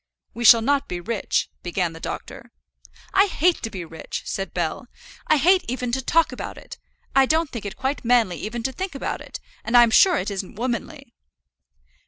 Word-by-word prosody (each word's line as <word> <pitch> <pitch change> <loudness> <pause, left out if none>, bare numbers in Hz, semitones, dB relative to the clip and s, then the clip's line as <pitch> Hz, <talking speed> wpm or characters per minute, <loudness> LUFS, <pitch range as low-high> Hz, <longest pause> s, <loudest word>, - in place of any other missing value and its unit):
"We 240 +1 -4
shall 230 0 +8
not 280 +2 +1
be 180 - -4
rich 215 +3 -2
" - - -46
began 175 -1 -2
the 165 - -10
doctor. - - -7 0.6
"I 395 +1 +5
hate 355 -1 +1
to 225 - -3
be 185 -5 -6
rich," 160 0 -7
said 195 0 -4
Bell. 175 +8 -3 0.4
"I 310 - +4
hate 360 +6 +4
even 250 0 -3
to 265 +2 -1
talk 325 +5 +2
about - - -7
it. - - -11 0.4
I 270 -1 +5
don't 320 0 +1
think 230 -4 -6
it 200 - -8
quite 270 +2 -2
manly 230 -7 +2
even 230 +2 -5
to 265 - -1
think 365 +4 -5
about 275 - -4
it; - - -9 0.2
and 235 +2 +3
I'm 240 -1 +7
sure 360 +6 +6
it 205 - -2
isn't 195 0 -5
womanly." 245 +3 -4
240 Hz, 200 wpm, -23 LUFS, 200-280 Hz, 0.6 s, shall